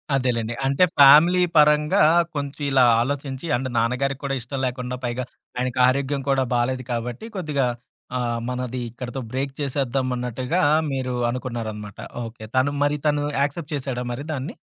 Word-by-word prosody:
అదేలెండి. 120 Hz, -4 st, 0 dB
అంటే 135 Hz, +5 st, +3 dB, 0.2 s
ఫ్యామిలీ 155 Hz, +6 st, +8 dB, 0.2 s
పరంగా 150 Hz, 0 st, +5 dB, 0.3 s
కొంచుం 140 Hz, 0 st, -4 dB
ఇలా 135 Hz, -2 st, +4 dB, 0.2 s
ఆలోచించి 135 Hz, +2 st, -3 dB
అండ్ 130 Hz, +2 st, -2 dB
నాన్నగారికి 125 Hz, +4 st, 0 dB
కూడా 135 Hz, -1 st, -1 dB
ఇష్టం 130 Hz, +3 st, -5 dB
లేకుండా 125 Hz, 0 st, -3 dB
పైగా 120 Hz, +1 st, -2 dB, 0.3 s
ఆయనకి 125 Hz, 0 st, -2 dB
ఆరోగ్యం 140 Hz, +2 st, 0 dB
కూడా 135 Hz, -1 st, +3 dB
బాలేదు 130 Hz, +2 st, 0 dB
కాబట్టి 120 Hz, -, -4 dB
కొద్దిగా 150 Hz, -8 st, 0 dB, 0.5 s
ఆహ్, 120 Hz, -1 st, -1 dB
మనది 125 Hz, 0 st, -3 dB
ఇక్కడితో 125 Hz, +3 st, -6 dB
బ్రేక్ 135 Hz, +1 st, -2 dB
చేసేద్దామన్నట్టుగా 130 Hz, +1 st, -1 dB, 0.3 s
మీరు 130 Hz, -2 st, -2 dB, 0.2 s
అనుకున్నారనమాట. 115 Hz, -5 st, -5 dB, 0.3 s
ఓకే. 115 Hz, -1 st, -10 dB
తను 130 Hz, +2 st, +3 dB
మరి 145 Hz, +1 st, +1 dB
తను 145 Hz, -1 st, +1 dB, 0.2 s
యాక్సెప్ట్ 150 Hz, +2 st, -2 dB
చేసాడా 130 Hz, -3 st, -3 dB
మరి 125 Hz, +4 st, -5 dB
దాన్ని? 145 Hz, -, -4 dB
130 Hz, 140 wpm, -23 LUFS, 125-140 Hz, 0.5 s, ఫ్యామిలీ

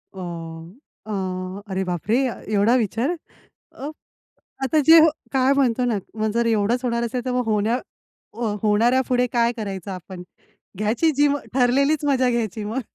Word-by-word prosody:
वाम 165 Hz, -2 st, -7 dB, 0.4 s
अ, 185 Hz, -1 st, -4 dB
अरे 190 Hz, 0 st, -1 dB
बापरे! 180 Hz, +5 st, -1 dB, 0.4 s
एवढा 210 Hz, +4 st, +4 dB
विचार. 235 Hz, +2 st, 0 dB, 0.6 s
अ, 280 Hz, -, -6 dB, 0.7 s
आता 310 Hz, +4 st, +2 dB
जे 325 Hz, +1 st, +10 dB, 0.3 s
काय 265 Hz, +1 st, +3 dB
म्हणतो 255 Hz, -3 st, +2 dB
ना 230 Hz, -4 st, +1 dB, 0.2 s
मग 215 Hz, 0 st, 0 dB
जर 235 Hz, +1 st, +1 dB
एवढंच 225 Hz, +3 st, +1 dB
होणार 235 Hz, -1 st, 0 dB
असेल 245 Hz, +2 st, -4 dB
तर 255 Hz, -, -1 dB
मग 250 Hz, -1 st, 0 dB
होण्या 215 Hz, +1 st, +1 dB, 0.6 s
अ, 230 Hz, -, -9 dB, 0.2 s
होणाऱ्या 230 Hz, +5 st, +3 dB
पुढे 250 Hz, -1 st, +2 dB
काय 235 Hz, -1 st, +3 dB
करायचं 195 Hz, -3 st, -5 dB
आपण? 185 Hz, 0 st, -8 dB, 0.5 s
घ्यायची 225 Hz, -, +1 dB
जी 290 Hz, 0 st, +5 dB, 0.3 s
ठरलेलीच 275 Hz, +4 st, +2 dB
मजा 260 Hz, -3 st, +2 dB
घ्यायची 220 Hz, -3 st, -2 dB
मग. 225 Hz, +6 st, -2 dB
230 Hz, 150 wpm, -22 LUFS, 200-255 Hz, 0.7 s, जे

